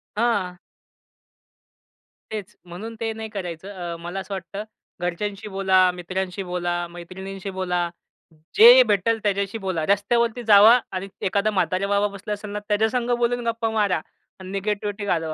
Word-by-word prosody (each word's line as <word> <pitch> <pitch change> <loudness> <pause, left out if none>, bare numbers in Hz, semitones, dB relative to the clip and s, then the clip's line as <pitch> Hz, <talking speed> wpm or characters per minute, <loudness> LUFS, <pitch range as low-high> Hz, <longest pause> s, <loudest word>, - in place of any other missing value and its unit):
हां. 205 -6 0 1.8
तेच. 210 -1 -6
म्हणून 210 +7 -8
ते 225 -1 -1
नाही 220 0 -6
करायचं. 185 -3 -6 0.2
अ, - - -5
मला 175 +3 -5
असं 195 +1 -6
वाटतं 195 +2 -5 0.4
घरच्यांशी 200 +4 -3
बोला, 190 -1 +3
मित्रांशी 185 +2 -4
बोला, 175 -1 -2
मैत्रिणींशी 190 +3 -8
बोला. 180 -2 -1 0.7
जे 245 +3 +10
भेटेल 215 +2 +2
त्याच्याशी 200 +1 0
बोला. 185 -6 -2
रस्त्यावरती 235 +4 +1
जावा 220 +3 +8
आणि 190 +1 -4 0.2
एखादा 200 +3 +1
म्हाताऱ्या 185 +1 0
बाबा 200 0 +2
बसला 200 +2 -5
असाल 205 0 -7
ना, 210 - -3
त्याच्या 220 +1 +2
संग 245 0 -1
बोलून 240 0 0
गप्पा 230 0 0
मारा 205 -7 +1 0.4
आणि 185 0 -9
निगेटिव्हिटी 205 +1 -2
घालवा. 165 -4 0
200 Hz, 145 wpm, -23 LUFS, 185-215 Hz, 1.8 s, जे